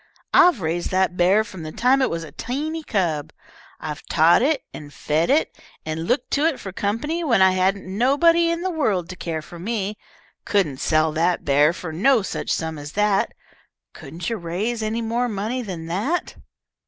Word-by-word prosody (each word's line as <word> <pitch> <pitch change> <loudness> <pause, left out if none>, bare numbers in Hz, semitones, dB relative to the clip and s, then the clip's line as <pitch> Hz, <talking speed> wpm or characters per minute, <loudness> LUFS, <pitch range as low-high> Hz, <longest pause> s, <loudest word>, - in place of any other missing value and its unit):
"I've 345 - +6
raised 165 +1 -2
that 185 -1 +1
bear 185 +5 +4
from 190 -5 -10
the 155 -1 -6
time 255 +8 +2
it 260 - +2
was 165 0 -3
a 155 - -10
teeny 290 - -4
cub. 170 - -1 0.5
I've 150 - -6
taught 165 +4 +4
it, 280 +1 +1
and 145 -1 -9
fed 155 +3 0
it, 295 +4 +2 0.3
and 160 +1 -4
looked 250 +4 0
to 295 +2 +2
it 315 -5 -1
for 195 - -7
company 230 - -2
when 245 -10 +3
I 190 - +6
hadn't 190 +2 0
nobody 285 - +3
in 335 +1 -2
the 375 - -1
world 215 - 0
to 185 - -6
care 160 -3 -4
for 170 +2 -11
me. 210 +1 -3 0.4
Couldn't 180 -10 0
sell 155 0 +2
that 170 +3 0
bear 145 +2 +4
for 170 -2 -7
no 230 +6 +3
such - - -4
sum 160 -2 -2
as 145 +1 -8
that. 210 -1 +1 0.6
Couldn't 170 +1 -8
you 230 - -1
raise 200 +7 -3
any 220 +2 -2
more 240 +2 0
money 220 +5 -2
than 180 -8 -6
that?" 210 - -2
195 Hz, 190 wpm, -22 LUFS, 165-245 Hz, 0.6 s, I've